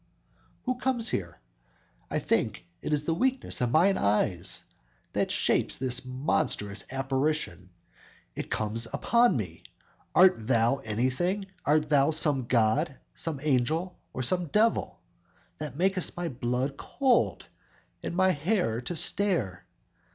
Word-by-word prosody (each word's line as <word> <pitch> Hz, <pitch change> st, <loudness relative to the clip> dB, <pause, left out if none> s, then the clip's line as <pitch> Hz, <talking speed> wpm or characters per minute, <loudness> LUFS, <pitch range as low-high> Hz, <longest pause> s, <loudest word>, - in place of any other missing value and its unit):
who 255 Hz, -, 0 dB
comes 245 Hz, -4 st, 0 dB
here? 85 Hz, -4 st, -3 dB, 0.7 s
I -, -, -1 dB
think -, -, 0 dB, 0.2 s
it -, -, -4 dB
is 150 Hz, -1 st, +1 dB
the 165 Hz, -, 0 dB
weakness 255 Hz, -, 0 dB
of 125 Hz, -, +2 dB
mine 175 Hz, +9 st, +4 dB
eyes, 100 Hz, -4 st, +1 dB, 0.5 s
That -, -, 0 dB
shapes -, -, +1 dB
this 130 Hz, -2 st, -1 dB
monstrous 130 Hz, -5 st, -1 dB
apparition. 135 Hz, -6 st, -1 dB, 0.7 s
It -, -, -5 dB
comes 110 Hz, +2 st, -1 dB
upon 235 Hz, -, +3 dB
me! 90 Hz, -7 st, -5 dB, 0.5 s
Art 180 Hz, -12 st, +5 dB
thou 120 Hz, +1 st, +3 dB
anything? 130 Hz, -, -1 dB, 0.2 s
Art 150 Hz, +1 st, +3 dB
thou 145 Hz, -1 st, +4 dB
some 150 Hz, -5 st, +2 dB
god, 130 Hz, +6 st, +2 dB, 0.2 s
some 160 Hz, -4 st, -3 dB
angel 155 Hz, +6 st, +1 dB, 0.2 s
or 130 Hz, -, -4 dB
some 180 Hz, +6 st, 0 dB
devil, 215 Hz, +8 st, +1 dB, 0.6 s
That 150 Hz, -3 st, -6 dB
makest 185 Hz, 0 st, 0 dB
my 175 Hz, -1 st, -2 dB
blood 125 Hz, +2 st, -2 dB
cold, 265 Hz, -3 st, +1 dB, 0.6 s
and -, -, -4 dB
my 185 Hz, +1 st, +4 dB
hair 155 Hz, -, 0 dB
to 175 Hz, +8 st, -4 dB
stare? 165 Hz, -, 0 dB
145 Hz, 130 wpm, -28 LUFS, 120-180 Hz, 0.7 s, Art